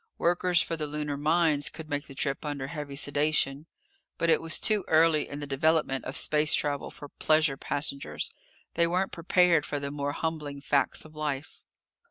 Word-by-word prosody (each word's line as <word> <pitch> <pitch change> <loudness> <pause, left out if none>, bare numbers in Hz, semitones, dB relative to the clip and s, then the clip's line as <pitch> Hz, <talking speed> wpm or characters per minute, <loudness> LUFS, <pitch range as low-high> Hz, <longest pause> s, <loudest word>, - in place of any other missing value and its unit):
Workers 175 0 +2
for 165 - -3
the 155 -2 -4
lunar 150 -1 -3
mines 155 0 +2
could 160 -1 -10
make 145 0 -3
the 135 - -11
trip 135 +1 -2
under 145 -3 -4
heavy 145 -1 -6
sedation. 145 +1 0 0.5
But 165 0 +2
it - - +3
was 165 0 +1
too 215 -3 +2
early 160 -1 +3
in 145 +1 -6
the - - -4
development 140 -1 +1
of 130 - -4
space 150 0 +5
travel 145 -1 -2
for 145 - -10
pleasure 155 -2 +2
passengers. 140 0 -2 0.4
They 170 0 +2
weren't 185 +3 0
prepared 170 -1 +3
for 145 - -3
the 140 0 -4
more 145 0 -3
humbling 150 -3 -4
facts 140 +1 0
of 155 0 -15
life. 150 -1 -4
150 Hz, 180 wpm, -28 LUFS, 145-160 Hz, 0.5 s, space